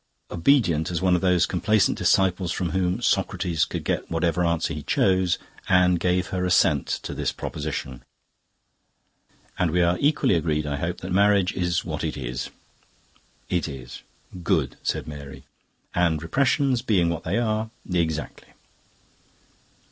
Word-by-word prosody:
Obedient 85 - +2
as 85 -2 -2
one 95 -1 +2
of 90 - +2
those 90 -2 +3
complaisant 105 +3 +2
disciples 90 -2 +2
from 90 -2 -2
whom 95 +4 -1
Socrates 90 -8 +1
could - - -5
get - - -2
whatever 85 +1 0
answer 85 -1 0
he 75 - -5
chose, 95 +3 +2 0.3
Anne 90 -1 +5
gave 90 +1 0
her 90 -1 -2
assent 90 -5 +3 0.2
to - - -5
this - - -1
proposition. 75 -4 -5 1.6
"And 90 - +2
we 90 +2 +2
are 85 +1 +2
equally 145 -7 +2
agreed, 75 -2 0
I 70 -1 -2
hope, 85 +4 -3
that 95 - -6
marriage 100 -1 +3
is 90 -2 -1
what - - -4
it - - -3
is." 60 -2 -4 1.0
"It 90 -2 -1
is." 65 -3 -9 0.4
"Good!" - - 0
said - - -2
Mary. 70 -2 -9 0.5
"And 85 -3 +1
repressions 135 - +1
being 95 -8 +2
what 85 - -4
they - - -1
are..." 110 -1 0 0.2
"Exactly." 80 -5 -2
90 Hz, 145 wpm, -24 LUFS, 80-95 Hz, 1.6 s, Anne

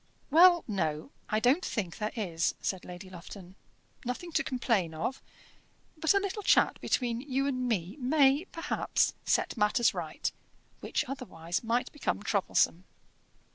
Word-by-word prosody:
"Well, 345 +2 +7
no; 160 - -2 0.2
I 215 - +2
don't 260 +10 +3
think 185 -4 -3
there 210 0 -1
is," 170 -7 -1
said 190 -2 -3
Lady 180 +2 -9
Lufton. 185 +1 -11 0.5
"Nothing 250 +8 -4
to - - +1
complain 225 -10 0
of; 205 +12 -3 0.7
but 320 +4 +2
a - - +5
little 400 +1 -3
chat - - +3
between 240 -2 0
you 270 0 -1
and 255 -3 -1
me 190 - -2
may, 275 +3 +3
perhaps, 330 -2 0
set - - +1
matters 210 +2 +3
right, - - -3 0.5
which, - - -2
otherwise, 175 -11 -4
might 235 +2 0
become 280 -8 -2
troublesome." 190 -3 +1
235 Hz, 140 wpm, -30 LUFS, 185-280 Hz, 0.7 s, Well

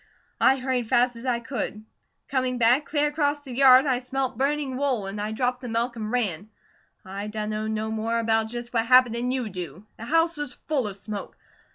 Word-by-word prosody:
I 265 - +5
hurried 255 -3 -2
fast 245 -1 +3
as 230 +3 -8
I 240 -2 +1
could. 220 -3 -5 0.4
Coming 255 -2 -1
back, 245 +5 +4
clear 295 -1 +1
acrost 290 -1 0
the 265 -3 -8
yard 260 +1 +7
I 260 -3 +1
smelt 260 +1 -2
burning 275 -1 -1
wool, 260 -6 0
an' 195 +2 -5
I 210 +1 -2
dropped 250 +2 -1
the 250 - -6
milk 235 +2 -1
an' 215 -2 -4
ran. 215 -5 -1 0.6
I 195 +2 -5
dunno 215 0 -3
no 220 0 -2
more 225 +1 -1
about 225 -1 +1
just 240 +1 -6
what 230 -1 +1
happened 250 -2 +6
'an 240 +1 -1
you 255 -2 -1
do. 180 -1 -7
The 225 - -6
house 330 +4 +2
was 295 -3 -5
full 275 -8 +1
of 200 -1 -7
smoke. 205 0 -7
245 Hz, 205 wpm, -25 LUFS, 220-265 Hz, 0.6 s, yard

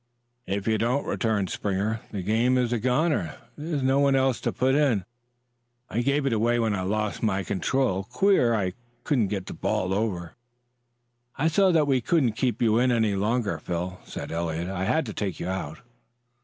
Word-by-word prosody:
"If 100 +2 -2
you 110 -1 +2
don't," 125 +5 0
returned 105 -5 0
Springer, 105 +3 -1
"the 100 -3 -5
game 115 +6 +2
is 125 -1 +1
a 120 - 0
goner. 125 - +1 0.2
There's 150 -2 -3
no 135 +1 +3
one 140 -1 +4
else 130 -2 +2
to - - 0
put 130 +1 +1
in. 135 - +2 0.9
I 120 - 0
gave 140 +3 +1
it 135 - +1
away 115 +2 +2
when 115 -2 +1
I 95 - -1
lost 105 +2 -2
my 100 -3 0
control. 100 +1 0
Queer 160 - +3
I 95 -4 -1 0.3
couldn't 125 -9 +1
get 95 -2 -3
the - - -7
ball 95 +1 -1
over." 95 -5 -2 1.0
"I 155 - +2
saw 195 +4 +4
that 155 -2 +4
we 135 -3 +2
couldn't 135 -2 +2
keep 120 +2 -1
you 110 0 +3
in 125 +1 +3
any 110 -3 +2
longer, 105 +2 0
Phil," 90 +1 -4
said - - -7
Eliot. 85 +1 -2
"I 95 -1 -2
had 155 +8 +1
to 110 - -6
take 100 -3 -3
you - - -4
out." 95 -5 -4
110 Hz, 190 wpm, -26 LUFS, 95-130 Hz, 1.0 s, one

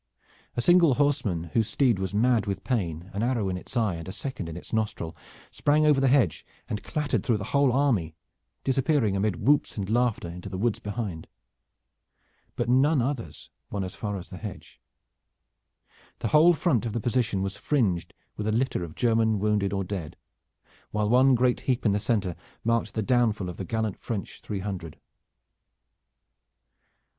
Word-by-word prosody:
A 120 - 0
single 175 -5 +5
horseman 120 - 0
whose 110 -2 +2
steed 125 -8 +2
was 95 -1 -2
mad 115 +1 +2
with 100 -1 -3
pain, 90 - -2
an 100 - -2
arrow 115 -4 0
in 90 - -2
its 90 +7 -6
eye 110 -5 +2
and 85 0 -7
a - - -4
second 100 -5 -5
in 80 - -6
its 90 - -10
nostril, 105 -7 -2 0.4
sprang 150 +1 +2
over 150 -3 +4
the 135 - +4
hedge 130 - +3 0.2
and 105 - -3
clattered 150 -3 -1
through 115 -4 +2
the 105 - -5
whole 140 -2 +4
army, 120 - +1 0.5
disappearing 135 -5 +2
amid 100 -3 -1
whoops 145 -2 +3
and 100 0 -3
laughter 120 -6 +1
into 90 +4 -7
the 95 - -5
woods 115 +2 0
behind. 105 -6 -5 1.3
But - - -1
none 135 +5 +4
others 120 - -3 0.2
won 100 -2 -2
as 90 - -5
far 105 -2 -4
as 90 - -9
the 90 - -8
hedge. 105 -3 -9 1.4
The 115 - -2
whole 165 +6 +6
front 135 - +1
of 110 - -4
the 120 - -1
position 115 -4 0
was 95 +1 -3
fringed 100 - 0 0.2
with 105 - -3
a - - +2
litter 120 -4 0
of 80 -2 -8
German 115 -2 +2
wounded 105 -1 +1
or 100 -1 -1
dead, 90 -5 -5 0.7
while 105 0 0
one 130 +2 +5
great 125 0 +2
heap 125 -2 -1
in 105 - +4
the 100 - +1
center 100 -5 0 0.3
marked 115 0 0
the 110 - 0
downfall 110 -5 +1
of 90 - -7
the 95 - -4
gallant 110 -1 -2
French 105 -4 -5
three 100 -3 -4
hundred. 95 -5 -6
110 Hz, 175 wpm, -27 LUFS, 95-125 Hz, 1.4 s, whole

